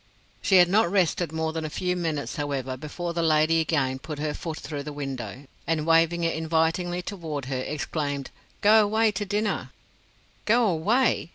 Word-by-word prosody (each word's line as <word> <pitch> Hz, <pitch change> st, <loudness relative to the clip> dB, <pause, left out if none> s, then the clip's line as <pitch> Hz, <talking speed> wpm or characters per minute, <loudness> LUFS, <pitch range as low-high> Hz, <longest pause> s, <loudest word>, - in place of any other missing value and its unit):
She 195 Hz, -, +3 dB
had 180 Hz, -1 st, +8 dB
not 195 Hz, 0 st, +3 dB
rested 175 Hz, -3 st, +1 dB
more 160 Hz, 0 st, -2 dB
than 160 Hz, 0 st, -3 dB
a 155 Hz, -, -3 dB
few 180 Hz, +4 st, -1 dB
minutes, 160 Hz, -5 st, -2 dB
however, 135 Hz, -3 st, -3 dB
before 170 Hz, +5 st, -5 dB
the 170 Hz, -, -1 dB
lady 160 Hz, 0 st, +3 dB
again 140 Hz, -5 st, 0 dB
put 150 Hz, +2 st, -7 dB
her 150 Hz, 0 st, -2 dB
foot 160 Hz, 0 st, -5 dB
through 145 Hz, -3 st, -5 dB
the 150 Hz, +1 st, -6 dB
window, 135 Hz, -4 st, -6 dB, 0.2 s
and 160 Hz, -2 st, 0 dB
waving 165 Hz, +1 st, +3 dB
it 165 Hz, -, +1 dB
invitingly 165 Hz, +2 st, 0 dB
toward 160 Hz, -8 st, -5 dB
her 130 Hz, -1 st, -3 dB
exclaimed: 145 Hz, 0 st, -3 dB, 0.3 s
"Go 215 Hz, +2 st, +7 dB
away 220 Hz, +1 st, +2 dB
to 205 Hz, +1 st, -3 dB
dinner." 210 Hz, +1 st, -1 dB, 0.8 s
"Go 235 Hz, +2 st, +4 dB
away!" 205 Hz, +3 st, +2 dB
160 Hz, 175 wpm, -26 LUFS, 150-180 Hz, 0.8 s, had